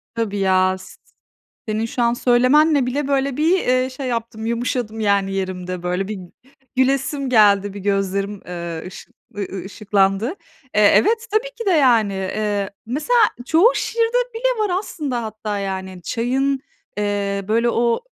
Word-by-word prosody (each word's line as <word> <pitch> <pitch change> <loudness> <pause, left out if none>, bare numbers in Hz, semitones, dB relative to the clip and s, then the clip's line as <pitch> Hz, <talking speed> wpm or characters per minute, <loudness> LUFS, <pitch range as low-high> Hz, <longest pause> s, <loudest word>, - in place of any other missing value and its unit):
Tabii 215 -3 -2
ya, 185 -1 +3
s 185 - -13 0.7
senin 215 +1 -1
şu 240 +1 -3
an 235 0 +3
söylemenle 260 +4 +4
bile, 275 +3 -2
böyle, 275 -1 0
bir, 320 +3 +3
eee, 255 +1 +1
şey 260 0 -6
yaptım, 230 -2 -4
yumuşadım, 235 -1 -2
yani, 200 -2 +1
yerimde, 185 -2 -4
böyle, 180 +2 -1
bir 210 -3 -5 0.6
gülesim 270 +1 +1
geldi, 205 -4 +4
bir 200 - -7
gözlerim, 195 0 -1
eee, 170 -1 -5
ışık 190 - -12 0.2
ııı, 200 - -2
ııı, 190 -1 -5
ışıklandı. 195 +1 +1 0.5
Eee, 210 -1 +6
evet, 455 +3 +2
tabii 450 +4 +1
ki 460 - -5
de, 385 - +3
yani, 235 - +4
eee 200 +1 -2 0.2
mesela 305 - +1 0.3
çoğu 350 - +5
şiirde 460 +1 0 0.2
bile 475 -1 0
var 370 -2 +1
aslında 280 - -4
hatta, 215 -1 -4
yani, 190 -2 -5
çayın, 265 +3 0 0.4
eee, 200 -1 -1
böyle, 230 +2 +2
o, 235 - +1
225 Hz, 150 wpm, -20 LUFS, 195-270 Hz, 0.7 s, Eee